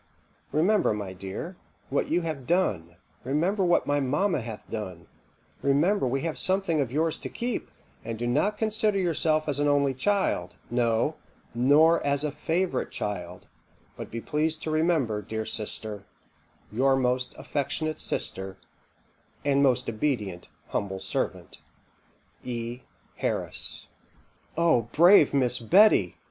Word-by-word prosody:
Remember, 170 - +2
my 100 -3 -5
dear, 100 - -7 0.3
what 140 - 0
you 175 +2 +2
have 155 -6 -4
done; 95 - 0 0.3
remember 170 - +1
what 175 -1 +3
my 145 0 +1
mamma 145 +4 +1
hath 110 -2 -8
done; 95 -6 -6 0.6
remember 145 +4 +2
we 135 +2 -1
have 165 -1 -2
something 185 -5 +1
of 130 -4 -2
yours 160 +3 0
to - - -6
keep, 240 0 -3 0.3
and 115 0 -5
do 120 - -3
not 150 +13 +1
consider 215 -1 +1
yourself 160 -4 +1
as 145 -1 +1
an 145 - +2
only 140 -1 +3
child; 135 - 0 0.2
no, 120 +4 +1 0.4
nor 145 +7 +4
as 140 0 +1
a 150 - -1
favourite 165 +5 -1
child; 90 -3 -5 0.5
but - - -7
be 115 - -5
pleased 155 +5 -1
to 155 - -2
remember, 155 -10 +1
Dear 110 +1 -4
sister, 105 -1 -2 0.7
Your 135 +5 +3
most 125 -1 0
affectionate 155 +2 -3
sister, 95 0 -4 0.9
"'and 140 -1 +3
most 130 -3 +3
obedient 110 -6 -2 0.2
humble 95 -1 -2
servant, - - -3 0.8
"'E. 120 0 -4 0.4
HARRIS.'" - - -1 0.7
"O 160 -9 +3
brave 175 -1 +7
Miss 130 -3 +1
Betty!" 135 - +4
140 Hz, 130 wpm, -27 LUFS, 115-165 Hz, 0.9 s, brave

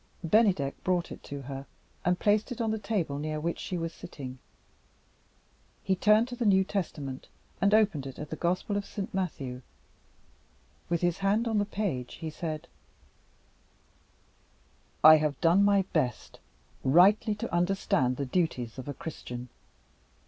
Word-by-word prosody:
Bennydeck 180 -7 +2
brought 180 -2 0
it - - -8
to 140 -1 -6
her, 135 +1 -7 0.4
and 180 +1 +2
placed 210 +5 +2
it 245 - -5
on 225 -2 0
the 220 - -2
table 185 -10 -2
near 155 0 -3
which 170 +2 -2
she 180 - -4
was 165 -1 -3
sitting. 130 -7 -9 1.4
He 190 - +1
turned 215 +5 +4
to 245 - -5
the 245 - -2
New 190 -3 +5
Testament, 150 -9 -4 0.3
and 200 - +4
opened 210 -10 +3
it 135 - -9
at 150 - -7
the - - -2
Gospel 180 +5 -1
of 200 - -3
Saint 200 -3 -5
Matthew. 140 -9 -3 1.3
With 170 -1 0
his 175 0 +1
hand 205 +4 +1
on 220 -2 +1
the 205 - +1
page, 195 - -3
he 160 -1 -6
said: 155 0 -5 2.4
"I 155 0 +10
have 150 -1 -1
done 175 +4 +4
my 200 -1 +4
best 130 -7 -1 0.4
rightly 195 - +5
to 205 - -5
understand 175 -8 +1
the 140 - -2
duties 130 -6 -1
of 130 - -7
a 145 - -4
Christian. 125 -5 -7
175 Hz, 155 wpm, -29 LUFS, 145-200 Hz, 2.4 s, I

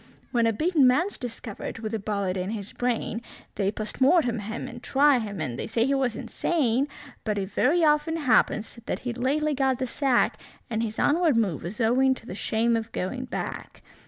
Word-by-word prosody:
When 235 -2 +3
a - - +3
beaten 305 - +3
man's 330 +11 +2
discovered 230 -4 -6
with 225 -1 -5
a 220 - -1
bullet 200 -2 -2
in 185 0 -2
his 210 -2 -5
brain, 240 -2 -1 0.3
They 195 -2 0
POST 215 +4 -6
MORTEM 260 -5 +4
him, 220 +3 -5
and 240 0 -9
try 275 0 +4
him, 205 -4 -5
and 130 -6 -3
they - - -3
say 225 +1 +1
he 275 - +1
was 265 -4 +1
insane; 275 -5 0 0.4
But 210 -2 -1
it 195 0 -3
very 320 - +3
often 300 +1 +3
happens 240 -5 +2
that - - -1
he'd 245 -1 -3
lately 300 +4 +1
got 265 -2 +1
the 260 - -1
sack, 260 0 +1 0.3
And 220 0 0
his 220 -1 -3
onward 315 -4 +3
move 195 -9 +1
was 195 +8 -7
owing 260 +3 +3
to 225 - -13
the - - -6
shame 225 +4 +1
of 225 0 -3
going 250 +8 -3
back. 250 - -6
240 Hz, 200 wpm, -26 LUFS, 215-270 Hz, 0.4 s, MORTEM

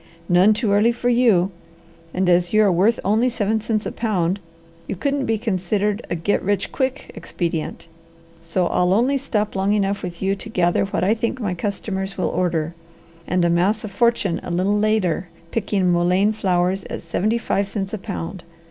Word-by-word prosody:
"None 185 +4 +5
too 215 -2 0
early 210 +4 +4
for 240 +1 -1
you, 225 -7 +3 0.6
and 185 +2 0
as 175 +1 +3
you 215 0 +5
are 200 - +4
worth 195 +7 +3
only 220 +5 +3
seven 220 -1 0
cents 215 -1 -1
a - - -3
pound, 195 -4 0 0.5
you - - -3
couldn't 280 +7 -1
be 225 0 +1
considered 205 0 -1
a - - -1
'get 175 +5 0
rich 205 +1 -1
quick' 265 +1 -2
expedient, 165 -2 -4 0.5
so 165 +2 -1
I'll 180 +1 +2
only 255 +7 +2
stop 215 -6 -2
long 195 +2 +1
enough 200 -1 0
with 175 -2 -6
you 195 0 +1
to 210 +3 -9
gather 175 -3 +2
what 195 -2 -2
I 200 +4 +4
think 230 +3 -2
my 205 -6 -1
customers 195 +1 -4
will 185 - 0
order, 165 -2 -1 0.5
and 180 0 +2
amass 175 +6 +2
a - - -4
fortune 205 -3 +1
a - - -7
little 185 +4 +1
later 205 -5 +1 0.2
picking 200 -4 +1
mullein 180 +4 +3
flowers 185 -2 0
at - - -6
seventy 210 +7 0
five 200 -3 -1
cents 195 -1 -4
a 215 - -3
pound. 185 -2 -6
195 Hz, 185 wpm, -21 LUFS, 180-220 Hz, 0.6 s, None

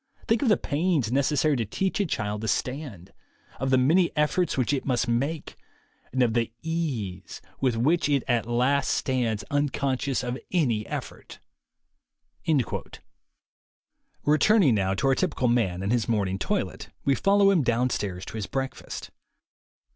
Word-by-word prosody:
Think 225 0 +2
of 270 - +2
the 210 - +5
pains 150 -6 0
necessary 140 +2 +2
to 115 - 0
teach 190 - -2
a 200 - +1
child 105 -6 -2
to 110 - -3
stand, 110 - -3 0.5
of 135 +2 -1
the 130 - +4
many 165 +8 +4
efforts 150 +3 +1
which 130 +2 +1
it 135 - -1
must 125 -2 0
make, 140 +7 -2 0.5
and 130 -1 +2
of 115 -2 +1
the 115 -1 0
ease 130 - -3 0.2
with 125 -4 +1
which 150 +7 +2
it 140 -3 +2
at 120 -3 +1
last 125 +4 +2
stands, 120 -5 0
unconscious 140 -2 0
of 125 +1 -3
any 120 - +1
effort." - - -7 2.9
Returning 155 - +4
now 95 -2 +1
to 100 - -2
our 135 - +4
typical 130 0 0
man 100 -7 +1
and 100 - -1
his 120 -2 +1
morn 105 -4 +1
ing 95 +1 -3
toilet, - - -2 0.2
we 140 - +4
follow 200 +5 +4
him 180 -5 +3
downstairs 115 -7 -1
to - - -7
his 105 - -4
break 135 -1 -2
fast. - - -8
130 Hz, 155 wpm, -26 LUFS, 115-150 Hz, 2.9 s, the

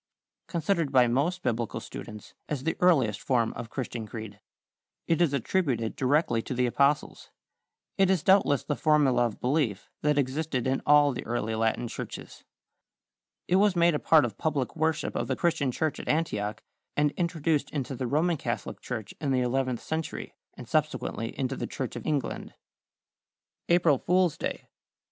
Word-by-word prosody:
= - - -65
Considered 170 -3 0
by 125 -2 +5
most 160 +10 0
Biblical 115 -1 -1
students 105 -1 -9 0.2
as 140 -4 -3
the 165 - 0
earliest 130 - +3
form 120 -4 +1
of 115 -1 -7
Christian 120 -4 -5
creed. 110 -2 -8 0.7
It 165 0 +1
is 170 -5 +4
attributed 135 -5 0
directly 135 -3 +2
to 125 - -5
the 125 0 +2
Apostles. 140 +4 +1 0.7
It 195 -1 +5
is 185 -5 +2
doubtless 190 -8 +4
the 145 - -2
formula 140 -6 +3
of 110 - -9
belief 125 -7 -1
that 150 0 +2
existed 140 -1 -1
in 130 +1 0
all 145 -1 +6
the 125 - -5
early 115 -2 -1
Latin 110 +2 0
churches. - - -8 1.0
It 180 - +3
was 200 -1 +4
made 170 0 +4
a 150 - 0
part 155 -4 +5
of 110 -4 -6
public 145 -5 -1
worship 160 -1 0
of - - -1
the - - 0
Christian 165 -6 +1
church 155 +4 -1
at - - -8
Antioch, 105 -10 -1 0.3
and 150 0 +3
introduced 165 -3 0
into 135 -2 -3
the 125 0 -3
Roman 160 +6 +1
Catholic 120 -3 -4
Church 110 -4 -5
in 145 - -1
the 130 -1 +2
eleventh 125 -1 -1
century, 160 -1 -4 0.2
and - - -9
subsequently 115 0 -1
into 130 -2 -1
the - - -4
Church - - -5
of - - -6
England. 150 -3 -2 1.1
=April 170 -6 +4
Fool's 180 -2 +2
Day. - - -4
140 Hz, 165 wpm, -28 LUFS, 120-160 Hz, 1.1 s, all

